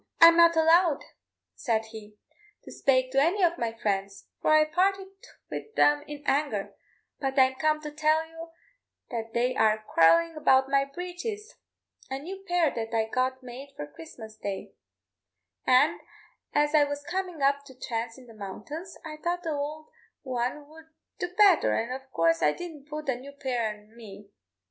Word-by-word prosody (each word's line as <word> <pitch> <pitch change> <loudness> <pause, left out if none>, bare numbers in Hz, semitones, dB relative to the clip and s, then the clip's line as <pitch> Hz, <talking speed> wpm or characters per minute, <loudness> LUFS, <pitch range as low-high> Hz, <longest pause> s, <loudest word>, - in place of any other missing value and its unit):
"I'm 335 0 +9
not 335 0 +6
allowed," 325 -1 +4 0.5
said 225 -3 -1
he, 215 -1 -11 0.5
"to - - -11
spake 255 -1 +1
to 270 +1 +3
any 360 +6 +2
of 345 0 +2
my 235 -1 -1
friends, 200 -3 -3 0.2
for - - +1
I 310 0 +6
parted 380 +4 0 0.4
wid 445 - -7
them 295 0 +4
in 295 -1 -8
anger; 275 -9 0 0.5
but 270 0 -2
I'm 260 0 +5
come 310 +3 +1
to 300 -1 -6
tell 310 +1 +2
you 325 +1 -10 0.6
that 225 -2 -5
they 250 +2 +1
are 220 -2 +3
quarrelin' 315 - +3
about 265 -3 +3
my 275 0 +3
breeches 360 +8 -6 0.6
a 265 - -3
new 380 +7 -8
pair 350 -4 +2
that 230 0 -4
I 220 -1 +1
got 255 +2 -1
made 265 +3 -10
for 150 - -5
Christmas 215 +9 -12
day; 200 -1 -5 0.9
an' 280 +6 +4 0.5
as 295 0 +2
I 300 -1 +6
was 285 0 -3
comin' 360 -4 -3
up 280 +1 +2
to 260 -2 -14
thrace 230 -1 -4
in 260 - -14
the 230 - -14
mountains, 220 - -8
I 305 -1 -7
thought 350 +3 -2
the 325 -2 -2
ould 295 +2 -4 0.4
one 255 +2 -3
'ud 315 +1 -15 0.3
do 360 - -1
betther, 400 -6 +5
an' 230 +2 -2
of 265 +1 -7
coorse 165 -4 +2
I 150 - +3
didn't 310 -5 -9
put 305 0 -5
the 265 -4 -1
new 275 +3 -11
pair 245 -5 -2
an 210 +2 -21
me. 205 -3 -12
280 Hz, 175 wpm, -27 LUFS, 230-320 Hz, 0.9 s, I'm